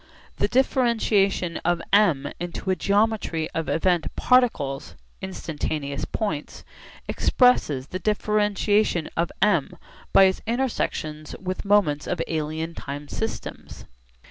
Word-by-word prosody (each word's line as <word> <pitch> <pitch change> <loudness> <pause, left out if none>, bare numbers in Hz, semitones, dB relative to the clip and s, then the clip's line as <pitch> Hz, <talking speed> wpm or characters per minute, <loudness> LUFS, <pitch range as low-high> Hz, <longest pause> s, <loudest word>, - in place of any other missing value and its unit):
The - - +1
differentiation 220 -9 +2
of 175 0 0
M 165 -10 +4
into 175 +2 -3
a - - +2
geometry 200 -4 +1
of 165 -1 -3
event 175 0 +1
particles 190 - +1 0.3
(instantaneous 155 -6 -4
points) 160 -10 -4 0.4
expresses 155 - +2
the 185 - -4
differentiation 210 -3 +1
of 170 0 0
M 180 -4 +2 0.3
by 195 - +7
its 190 0 +3
intersections 220 -11 -2
with 185 +1 -4
moments 195 -8 +2
of 175 - -2
alien 160 +1 -3
time 145 0 -7
systems. 220 - -6
185 Hz, 110 wpm, -24 LUFS, 155-210 Hz, 0.4 s, by